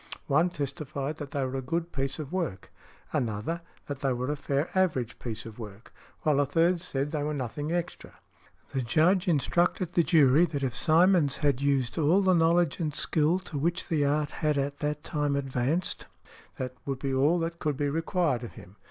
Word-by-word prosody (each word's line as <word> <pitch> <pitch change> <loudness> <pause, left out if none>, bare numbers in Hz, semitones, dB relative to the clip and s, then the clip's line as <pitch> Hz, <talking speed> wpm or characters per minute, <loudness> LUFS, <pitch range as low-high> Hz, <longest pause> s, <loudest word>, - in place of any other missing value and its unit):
One 155 +6 +3
testified 145 -1 -4
that 145 -3 -6
they 140 -1 -1
were 130 +1 -3
a - - -4
good 165 +6 -2
piece 135 0 -2
of 150 -3 -6
work; 165 - -3 0.4
another, 115 +9 -1 0.2
that 145 -2 -5
they 135 -2 0
were 125 +3 -2
a - - -1
fair 140 +2 -1
average 145 -11 0
piece 115 -3 -5
of 115 0 -10
work; 105 0 -10 0.3
while 150 -2 +3
a 145 - +3
third 165 +4 +2
said 145 -4 -2
that 155 - -1
they - - -1
were 150 0 -2
nothing 145 +4 -3
extra. 175 0 -4 0.5
The 135 - -1
Judge 165 +10 +3
instructed 175 +3 +1
the 175 - +4
jury 155 -2 +5
that 145 -4 -4
if 130 -3 -1
Simonds 165 -3 +4
had 140 -3 +1
used 140 -1 +1
all 165 +6 +4
the 185 -1 +4
knowledge 170 -1 +3
and 155 -4 -2
skill 155 +3 +2
to 155 -6 -5
which 170 +5 -1
the 155 -3 +2
art 145 +1 +1
had 150 -2 0
at 140 +1 -2
the 150 0 0
time 150 -1 -2
advanced, 140 +5 -1 0.5
that 125 -1 -4
would 135 -1 -1
be 135 0 -2
all 145 +6 +3
that 170 0 -3
could 150 -3 -1
be 145 - 0
required 165 - 0
of 120 - -7
him. 95 +4 -14
145 Hz, 200 wpm, -28 LUFS, 135-165 Hz, 0.5 s, jury